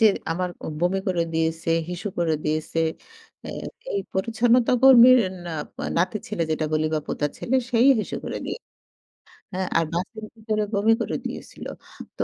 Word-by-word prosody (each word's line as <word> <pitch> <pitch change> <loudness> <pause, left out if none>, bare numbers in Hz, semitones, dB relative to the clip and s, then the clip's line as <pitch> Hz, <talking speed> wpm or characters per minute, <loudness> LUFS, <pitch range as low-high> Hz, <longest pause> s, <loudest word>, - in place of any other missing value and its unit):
যে 225 - +5 0.3
আমার 180 +2 -1 0.2
অ - - -4
বমি 180 +2 +2
করে 175 -2 +1
দিয়েছে, 165 0 0 0.2
হিসু 180 +4 -4
করে 165 -2 +2
দিয়েছে। 155 +1 -1 0.6
অ্যা - - -7 0.4
এই 400 - 0
পরিচ্ছন্নতা 230 +5 +2
কর্মীর 255 -1 +9 0.3
না 175 - -5 0.5
নাতির 185 +4 0
ছেলে 190 -6 -1
যেটা 155 0 0
বলি 155 0 +2
বা 155 - +1
পোতার 145 0 -1
ছেলে 260 +2 0
সেই 240 +1 +4
হিসু - - -4
করে - - -4
দিয়ে। - - -4 1.0
হ্যাঁ, 185 0 -1
আর 165 - +2
বাসের 215 +5 -4
ভিতরে 215 -1 -1
বমি 210 +3 +4
করে - - -1
দিয়েছিল। - - -7 0.5
তো - - 0
190 Hz, 160 wpm, -24 LUFS, 165-225 Hz, 1.0 s, কর্মীর